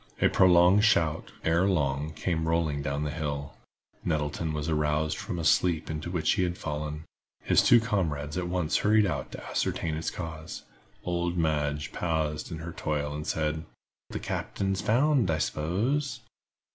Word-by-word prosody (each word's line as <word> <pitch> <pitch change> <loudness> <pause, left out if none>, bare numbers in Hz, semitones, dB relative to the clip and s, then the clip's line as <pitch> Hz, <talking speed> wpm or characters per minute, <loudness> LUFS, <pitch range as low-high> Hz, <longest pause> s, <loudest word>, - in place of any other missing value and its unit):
A - - +4
prolonged 90 +2 +5
shout, 80 -8 +2
ere 85 +4 +3
long, 75 -4 0
came 80 -1 -1
rolling 80 -3 +1
down 70 +1 -2
the 75 - -2
hill. 70 -2 -4 0.5
Nettleton 75 0 -1
was 75 0 -3
aroused 75 0 +1
from - - -5
a 85 - -3
sleep 80 0 +2
into 75 +2 -4
which 85 -3 +1
he 105 - 0
had 90 -1 -1
fallen. 75 0 -4 0.4
His - - +4
two 120 - +6
comrades 80 -10 -1
at 90 -1 -2
once 90 -3 0
hurried 105 0 +4
out 70 -8 -3
to - - -8
ascertain 80 - -1
its 80 - -2
cause. 80 -2 -7 0.4
Old 85 0 -1
Madge 75 -2 0
paused 80 -2 -2
in 80 - -4
her 80 +2 -6
toil 75 -1 -2
and 75 +1 -5
said: 80 0 -1 0.5
"The - - -4
captain's 95 0 -2
found, 125 - +3
I 80 - +2
s'pose." 110 - -1
80 Hz, 160 wpm, -28 LUFS, 75-90 Hz, 0.5 s, two